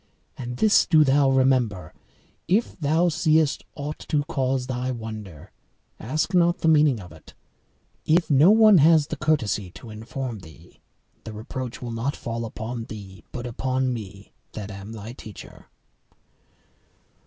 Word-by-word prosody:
And 125 -1 -6
this 215 -2 +4
do 155 -3 +6
thou 140 0 +3
remember, 125 -10 +1 0.5
if 205 +7 +1
thou 160 +3 +2
seest 160 -2 +2
aught 150 +1 -5
to 145 -1 +1
cause 135 -4 -1
thy 130 0 -3
wonder, 110 - -7 0.5
ask 155 - -2
not 175 -1 +3
the - - +1
meaning 150 -6 +4
of 90 -4 -11
it; 80 -1 -16 0.7
if 170 +2 +2
no 145 +4 +5
one 215 -3 +7
has 155 0 +5
the 155 - -5
courtesy 140 -11 0
to 115 - -11
inform 115 +2 -6
thee, 80 0 -16 0.4
the 110 - -8
reproach 120 +3 -6
will 120 - -5
not 115 +5 -2
fall 115 0 -4
upon 115 +1 -6
thee, 100 -4 -10
but 125 -1 -6
upon 130 +1 -1
me 100 -3 -9 0.2
that 105 -1 -6
am 100 +2 -9
thy 110 +1 -8
teacher." 110 -6 -12
130 Hz, 145 wpm, -24 LUFS, 110-155 Hz, 0.7 s, one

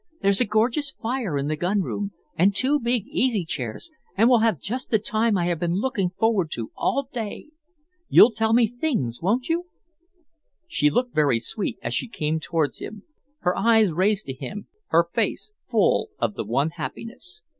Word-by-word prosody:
"There's 200 +2 +3
a - - +4
gorgeous 230 +7 +1
fire 230 - -3
in 140 - -1
the 155 - 0
gun 185 +6 0
room, 205 +3 -3 0.2
and 195 +2 +3
two 275 +7 +2
big 240 -4 0
easy 225 -9 0
chairs, 130 - -5 0.3
and 225 +3 +5
we'll 245 -2 +5
have 220 -8 +2
just 250 - -4
the 220 - +4
time 215 0 +1
I 175 - 0
have 175 -2 -1
been 170 0 0
looking 205 -3 0
forward 195 -2 +1
to 115 -2 -5
all 275 -2 0
day. 225 +3 -5 0.6
You'll 235 - +8
tell 220 0 0
me 235 +1 +5
things, 225 - -2
won't 225 +9 +1
you?" 340 +2 -1 1.0
She 150 - +2
looked 245 +10 0
very 145 -6 +3
sweet 210 - -3
as - - -2
she - - 0
came 160 -7 -2
towards 160 -2 -1
him, 210 -1 -8 0.4
her 180 0 +1
eyes 220 -4 +4
raised 195 +5 +1
to 135 - -4
him, 205 +10 -7 0.2
her 170 +1 +3
face 420 - -1 0.2
full - - +2
of - - -1
the 115 - -4
one 140 +8 0
happiness. 175 +1 -7
205 Hz, 185 wpm, -24 LUFS, 170-235 Hz, 1.0 s, You'll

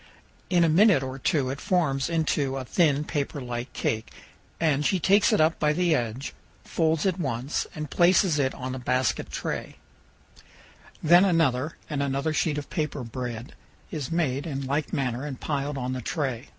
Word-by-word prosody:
In 175 -2 +4
a - - +4
minute 175 -2 +5
or 130 +1 -5
two 135 -1 +1
it 140 - -6
forms 150 -7 +1
into 150 -5 0
a 130 - -4
thin 150 0 +2
paperlike 130 -5 -4
cake, 110 0 -2 0.5
and 150 -3 +2
she 185 +5 +2
takes 200 +5 +4
it - - +3
up 155 +1 +3
by 150 0 +2
the 175 0 +2
edge, 120 0 -2 0.3
folds 160 0 +1
it 190 -1 +1
once, 135 -2 -2
and 150 -2 -5
places 175 -2 +4
it 135 -1 0
on 130 0 -5
a 130 - -5
basket 125 0 0
tray; - - -4 1.3
then 175 +3 +7
another 160 -6 +1
and 145 -3 -2
another 140 +2 -1
sheet 150 -1 0
of 145 - -5
paper 150 -5 -2
bread 120 0 -6 0.4
is 150 -4 -4
made 150 -3 0
in 140 -3 -3
like 140 +3 -1
manner 130 -2 -1
and 140 -3 -5
piled 145 -1 -2
on 130 0 -2
the 130 - -4
tray. 135 -3 -3
145 Hz, 175 wpm, -26 LUFS, 130-160 Hz, 1.3 s, then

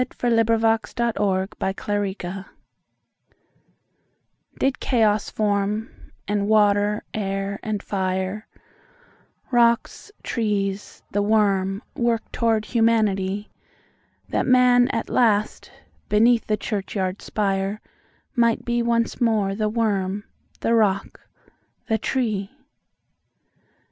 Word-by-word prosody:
1900. 230 -2 +1
By 225 0 +4
John 235 -1 -1
HallIngham 190 -2 0
1378 200 0 -2
Genesis 190 +2 -6 2.1
DID 270 0 +1
Chaos 215 -4 +2
form,—and 205 0 -2
water, 210 -1 +3
air, 195 -1 -3
and 210 -2 -3
fire, 190 +1 -2 1.0
Rocks, 235 - +2
trees, 205 -3 -2
the 205 - +1
worm, 200 -1 +1
work 235 -2 +1
toward 225 -2 +1
Humanity,—That 210 -4 -2
Man 250 -1 +5
at 230 - -2
last, 215 -3 +1 0.4
beneath 230 +2 +4
the 215 - +1
churchyard 195 -2 -3
spire, 195 0 -1 0.6
Might 235 -2 +2
be 240 0 0
once 235 0 0
more 215 -4 +2
the 215 +1 -1
worm, 205 -3 -1 0.4
the 230 - +1
rock, 200 -4 +1 0.7
the 220 0 +1
tree? 215 -6 -1
210 Hz, 95 wpm, -23 LUFS, 195-230 Hz, 2.1 s, Man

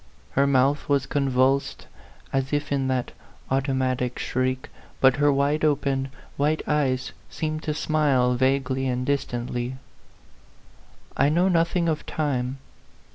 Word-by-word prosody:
Her 140 +1 +2
mouth 140 +2 +2
was 140 -1 +2
convulsed, 135 -1 +1 0.5
as 135 0 0
if 145 0 -1
in 135 -2 +1
that 130 -2 -1 0.4
auto 135 +1 +1
matic 130 -1 -1
shriek, 130 0 -2 0.3
but 130 0 +5
her 145 0 +4
wide 140 +3 +1
open, 140 -3 +1 0.3
white 150 +2 +1
eyes 130 -4 0 0.2
seemed 155 0 -3
to 150 - -1
smile 140 -6 +2
vaguely 130 +1 +1
and 125 0 -1
distantly. 125 -2 -2 1.4
I 140 - +3
know 175 +5 +3
nothing 170 0 +2
of 155 -2 -1
time. 135 -4 -1
135 Hz, 130 wpm, -25 LUFS, 130-145 Hz, 1.4 s, but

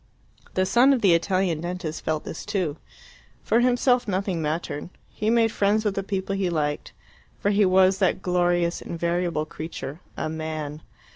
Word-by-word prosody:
The 185 - +2
son 250 +7 +5
of 255 - 0
the 190 -4 +5
Italian 175 -1 +1
dentist 175 -2 -4
felt 155 -1 -1
this - - -7
too. 185 -8 -2 0.7
For 230 - +3
himself 245 0 +3
nothing 190 -3 -1
mattered; 155 0 -3 0.2
he 215 - -1
made 230 -1 +3
friends 210 +1 +1
with 205 - +1
the 195 - -1
people 195 0 -3
he 195 -2 0
liked, 150 -3 -2 0.5
for 205 - +1
he 205 0 +4
was 190 +1 +4
that 190 -2 +2
glorious 175 -1 +1
invariable 170 -1 -1
creature, 155 -1 -7 0.2
a - - -2
man. 155 -1 -4
180 Hz, 160 wpm, -25 LUFS, 160-200 Hz, 0.7 s, son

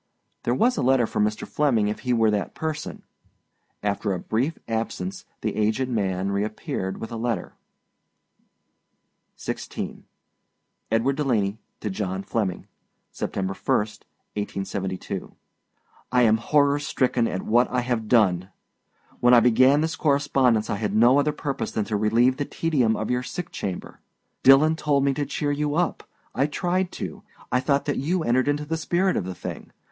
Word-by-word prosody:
There 120 - +2
was 245 - +2
a - - +1
letter 130 -1 +4
for - - -4
Mr. 105 0 0
Flemming 125 -8 +2
if 105 - -2
he 125 - -2
were 115 -2 +3
that 105 -1 -2
person. 155 -1 -4 0.8
After 100 0 0
a 90 - -3
brief 125 - -1
absence 150 +12 -3 0.2
the 110 - -2
aged 110 +5 +1
man 95 -4 -1
reappeared 100 -2 -3
with 115 - -6
a 115 - -4
Letter. 115 -5 -2 1.8
XVI. - - -5 0.9
EDWARD 115 +5 +2
DELANEY 110 -8 0 0.2
TO 105 - -2
JOHN 95 -1 -3
FLEMMING. 95 -3 -2 0.5
September 95 0 -3
1, - - +1
1872. 100 -2 -5 0.8
I 125 -1 +4
am 110 -1 +5
horror 145 +4 +3
stricken 125 -4 +1
at 95 - -3
what 120 +3 +3
I 125 0 0
have 120 -3 -2
done! 95 -6 +3 0.7
When 125 0 +6
I - - +8
began 130 +5 +5
this 160 0 -1
correspondence 135 -6 +2
I 105 - -1
had 105 -1 -2
no 120 +5 +6
other 150 +1 +2
purpose 145 -2 -3
than 110 - -2
to 110 - -2
relieve 115 +5 +3
the 145 - -1
tedium 135 -11 +1
of 110 - -2
your 125 0 +1
sick 170 +6 -6
chamber. 95 -3 -5 0.4
Dillon 145 +4 +6
told 145 -3 +1
me 140 0 +2
to 145 +1 -2
cheer 145 -2 -1
you 145 0 -1
up. 175 +1 -1 0.2
I 135 +3 +2
tried 180 +3 -1
to. - - -6 0.3
I 125 - +3
thought 140 +1 +1
that 145 - -1
you 165 +5 0
entered 130 0 +2
into 145 +1 0
the 160 +2 -2
spirit 180 +4 +1
of - - -1
the 95 0 -5
thing. - - -7
120 Hz, 160 wpm, -25 LUFS, 105-145 Hz, 1.8 s, I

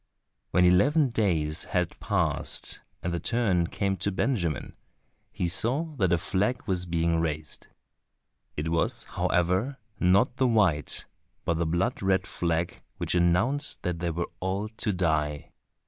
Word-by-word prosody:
When 90 - +4
eleven 130 - +4
days 80 -9 0
had 90 -2 -1
passed - - -1 0.2
and 85 - -1
the 85 - -1
turn 95 -4 +1
came 95 +1 -1
to 100 - 0
Benjamin, 95 - -1 0.6
he 90 - -2
saw 130 - 0
that 95 -5 +2
a 85 - +4
flag 100 +8 -1
was 90 -3 -1
being 85 0 +1
raised. 75 -2 -3 0.9
It 75 +2 -2
was, 85 0 0
however, 95 +10 0 0.2
not 95 +7 +3
the 130 - +3
white, 95 - +2 0.4
but 85 -2 0
the 85 - +1
blood 90 +10 0
red 95 -1 +2
flag 85 0 -2 0.2
which - - -1
announced 90 - +2
that 90 -2 -2
they 85 0 -1
were 85 +1 -3
all 95 +3 -2
to 110 -1 0
die. 80 -5 -1
90 Hz, 145 wpm, -27 LUFS, 85-105 Hz, 0.9 s, When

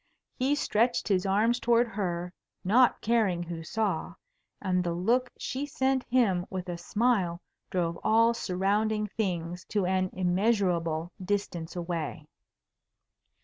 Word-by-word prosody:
He 270 +3 +1
stretched 235 -3 +1
his 195 -2 +1
arms 220 +5 +2
towards 235 0 +3
her, 180 -3 -3 0.3
not 240 +7 +4
caring 210 -7 +1
who 170 -1 -6
saw, 215 +5 -2 0.4
and 180 -1 0
the 170 -1 -1
look 240 +8 +1
she 275 +3 -3
sent 265 -1 +1
him 200 -8 +2
with 185 -1 -5
a 175 - -3
smile 195 -3 +1 0.3
drove 170 -2 -1
all 230 +1 +4
surrounding 210 +1 0
things 180 -4 -3
to 205 -4 0
an 185 0 +1
immeasurable 180 -4 +1
distance 185 -4 -2
away. 170 -4 -4
195 Hz, 125 wpm, -28 LUFS, 175-230 Hz, 0.4 s, not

